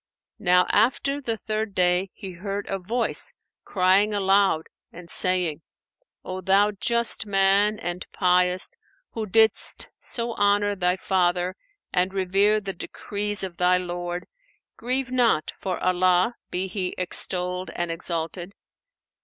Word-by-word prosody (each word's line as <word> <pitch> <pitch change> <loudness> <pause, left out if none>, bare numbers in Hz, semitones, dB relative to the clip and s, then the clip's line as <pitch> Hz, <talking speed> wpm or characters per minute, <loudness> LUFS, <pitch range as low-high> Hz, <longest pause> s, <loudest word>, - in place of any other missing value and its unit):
Now 180 -3 +3
after 260 +6 +1
the 230 -4 -3
third 215 -2 -4
day, 180 +1 +2
he 195 - -8
heard 195 +3 -5
a 195 - -3
voice 230 +6 +1 0.3
crying 195 +3 +2
aloud 195 -4 +2 0.3
and 170 0 -12
saying, 180 -4 +3 0.6
"O 185 0 -5
thou 200 +2 +3
just 225 +3 +2
man, 200 +2 +2
and 175 0 -5
pious, 180 0 +1 0.4
who 220 -2 -5
didst 220 +1 +2
so 235 -1 -2
honour 205 0 +2
thy 180 -1 +1
father 180 -1 0 0.4
and 185 +2 0
revere 195 +3 +2
the 195 -2 -6
decrees 205 +3 -4
of 180 -3 -6
thy 180 0 +3
Lord, 175 0 -5 0.5
grieve 255 +2 -2
not, 235 - +1
for 185 -2 -3
Allah 185 +3 +2 0.2
(be 180 +1 -2
He 185 -1 -4
extolled 180 0 +1
and 175 -1 -3
exalted!) 170 +2 -4
190 Hz, 130 wpm, -24 LUFS, 180-205 Hz, 0.6 s, Now